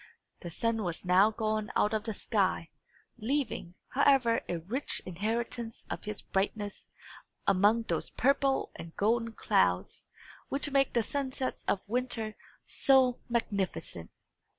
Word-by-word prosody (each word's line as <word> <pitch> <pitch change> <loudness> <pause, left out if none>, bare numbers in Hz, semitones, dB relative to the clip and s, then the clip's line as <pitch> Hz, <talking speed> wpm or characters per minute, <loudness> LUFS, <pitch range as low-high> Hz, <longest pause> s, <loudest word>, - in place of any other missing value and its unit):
The 175 - -7
sun 225 +6 0
was 175 -2 -3
now 185 +4 +6
gone 215 -1 -2
out 210 - +3
of 215 -1 -1
the 220 - -2
sky, 190 -7 0 0.5
leaving, 230 -7 -2
however, 260 -4 +4
a 175 - 0
rich 215 - -1
inheritance 225 +5 -3
of - - -5
his 210 0 -5
brightness 205 +1 -2 0.6
among 205 +5 +4
those - - -2
purple 275 0 +2
and 165 0 -9
golden 230 +2 +1
clouds 90 - +1 0.4
which 280 +1 -1
make 275 -1 +3
the 235 - +2
sunsets 265 0 -3
of 190 - +1
winter 230 -2 -1 0.3
so 260 -2 +4
magnificent. 200 - -2
220 Hz, 130 wpm, -31 LUFS, 195-250 Hz, 0.6 s, now